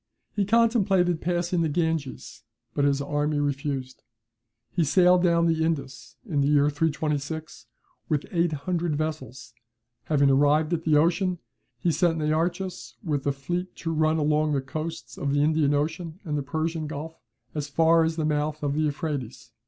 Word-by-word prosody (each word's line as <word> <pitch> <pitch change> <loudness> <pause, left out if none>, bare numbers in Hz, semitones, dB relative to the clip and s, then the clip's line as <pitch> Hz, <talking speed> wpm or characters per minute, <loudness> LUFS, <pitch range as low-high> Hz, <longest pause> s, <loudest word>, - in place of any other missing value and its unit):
He 205 -2 +1
contemplated 200 -6 +3
passing 175 0 0
the 160 - +1
Ganges, 160 -3 -2 0.3
but 145 - +1
his 140 0 +1
army 145 +1 -1
refused. 140 -2 -2 0.7
He 175 - +1
sailed 180 +3 +5
down 170 -1 +3
the 160 -1 +2
Indus, 150 -5 -3
in 150 -7 0
the 140 - +2
year 145 0 +4
326, 150 0 -2 0.4
with 150 -2 0
eight 170 -1 +1
hundred 165 +2 -1
vessels; 145 -6 -5 0.5
having 140 -3 +3
arrived 145 +4 +3
at 165 -1 -2
the 155 -2 +4
ocean, 180 +4 +2 0.4
he 165 +8 +1
sent 165 0 +2
Nearchus 170 +4 -2
with 145 -6 -2
a - - +3
fleet 175 +7 -4
to 165 -1 -3
run 155 0 +2
along 150 0 +2
the 140 - +1
coasts 155 +4 -6
of 140 -1 -1
the 145 0 +3
Indian 150 -2 +2
Ocean 160 +3 -2
and 155 -5 -3
the 145 - 0
Persian 160 +2 -2
Gulf, 160 +2 -7 0.3
as 150 -1 -3
far 165 +2 +4
as 160 0 0
the 160 -2 -1
mouth 150 0 -1
of 140 -1 0
the 155 - 0
Euphrates. 145 -6 -3
155 Hz, 165 wpm, -26 LUFS, 145-170 Hz, 0.7 s, sailed